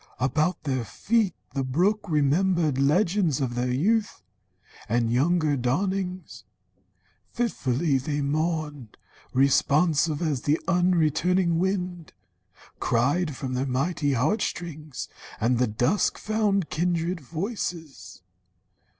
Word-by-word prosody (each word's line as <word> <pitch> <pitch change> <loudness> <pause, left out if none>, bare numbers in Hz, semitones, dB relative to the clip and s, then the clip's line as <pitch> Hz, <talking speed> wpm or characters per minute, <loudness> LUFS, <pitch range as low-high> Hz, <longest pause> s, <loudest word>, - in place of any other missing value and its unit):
About 155 +7 0
their 130 -4 -1
feet 200 - 0 0.2
The 135 -1 -1
brook 180 +11 0
remembered 155 0 +2
legends 170 +1 +2
of 130 -3 -1
their 120 +1 -1
youth, 205 - 0 0.7
And 115 0 +1
younger 155 +3 +2
dawnings. 180 +2 -2 0.9
Fitfully 150 - 0
they 145 +3 -2
mourned, 150 -4 -2 0.3
Responsive, 145 +3 +3
as 150 -7 -1
the 150 +2 +1
unreturning 175 -1 +2
wind 180 -3 -2 0.7
Cried 140 +6 +1
from 130 -1 -4
their 130 +2 -1
mighty 145 +2 0
heart 150 - +1
strings, 155 -5 -5 0.3
and 120 +2 +1
the 125 - +3
dusk 120 - +1
Found 205 -4 0
kindred 170 +1 0
voices. 160 - -5
155 Hz, 105 wpm, -26 LUFS, 135-180 Hz, 0.9 s, Responsive